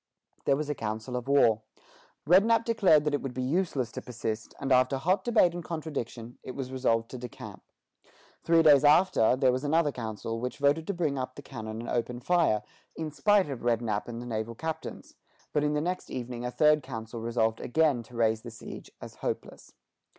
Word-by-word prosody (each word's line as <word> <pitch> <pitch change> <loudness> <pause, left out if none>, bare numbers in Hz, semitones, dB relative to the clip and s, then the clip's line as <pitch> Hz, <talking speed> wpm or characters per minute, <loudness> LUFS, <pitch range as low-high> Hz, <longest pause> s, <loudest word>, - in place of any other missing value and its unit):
There 140 - +4
was 150 0 -3
a 150 - -1
council 110 0 -4
of 125 +1 -4
war. 115 -6 +4 0.7
Rednap 220 +7 +5
declared 195 -10 +4
that 150 -1 -1
it 145 - 0
would 135 -2 -5
be 130 - -2
useless 140 - 0
to - - -6
persist; 115 -2 -5
and 140 -1 -3
after 130 +1 +4
hot 185 +7 +1
debate 220 -7 +4
and 175 0 -5
contradiction, 140 -8 -5
it 130 - -8
was 130 -2 -5
resolved 115 -3 +1
to 130 - -6
decamp. 125 -1 -9 0.8
Three 165 0 +4
days 145 -3 +7
after, 150 -5 +5
there 130 -1 +3
was 130 +2 -2
another 150 +1 +2
council, 115 -2 -5
which 125 +2 -4
voted 145 +3 +2
to 200 - -1
bring 150 -6 -1
up 130 0 -4
the 145 - -10
cannon 110 -4 -6
and 120 - -6
open 120 0 -1
fire, 145 -8 +2 0.3
in 160 -1 -4
spite 205 +4 +3
of 135 -4 -5
Rednap 115 -3 0
and 120 -1 -6
the 120 - -7
naval 115 0 -3
captains; 160 +5 -6 0.4
but 150 - +2
in 150 0 +1
the 150 - +1
next 180 +3 -3
evening 125 -1 -5
a - - -2
third 150 +3 +4
council 115 -3 -7
resolved 115 -1 0
again 145 -1 +2
to 115 +1 -15
raise 110 -1 +2
the 120 - -8
siege 115 0 -10
as - - -10
hopeless. - - -5
130 Hz, 200 wpm, -28 LUFS, 115-155 Hz, 0.8 s, days